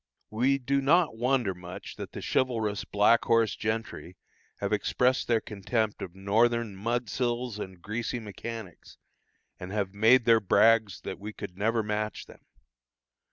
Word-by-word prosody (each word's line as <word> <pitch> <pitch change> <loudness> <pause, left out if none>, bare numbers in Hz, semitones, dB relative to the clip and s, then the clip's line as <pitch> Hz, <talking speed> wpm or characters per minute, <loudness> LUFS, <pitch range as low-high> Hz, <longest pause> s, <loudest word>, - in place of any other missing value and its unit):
We 130 +5 +2
do 140 +1 0
not 155 +1 +3
wonder 120 -3 +1
much 90 0 -9
that - - -7
the - - -7
chivalrous 110 -6 0
Black 105 +3 +3
Horse 115 -1 +3
gentry 110 -4 -4 0.4
have 100 +1 -2
expressed 125 +4 +1
their 115 -2 +3
contempt 105 +1 -2
of 90 -1 -7
Northern 110 +2 +1
"mudsills 120 +1 -2
and 95 -3 -7
greasy 115 +3 -3
mechanics," 110 -2 -8 0.6
and 90 +1 -7
have 100 -2 -2
made 115 +4 +5
their 115 -1 +6
brags 110 0 +3
that - - -6
we 105 +2 -7
could 90 - -8
never 110 +3 0
match 105 0 -3
them. - - -17
110 Hz, 145 wpm, -28 LUFS, 100-120 Hz, 0.6 s, their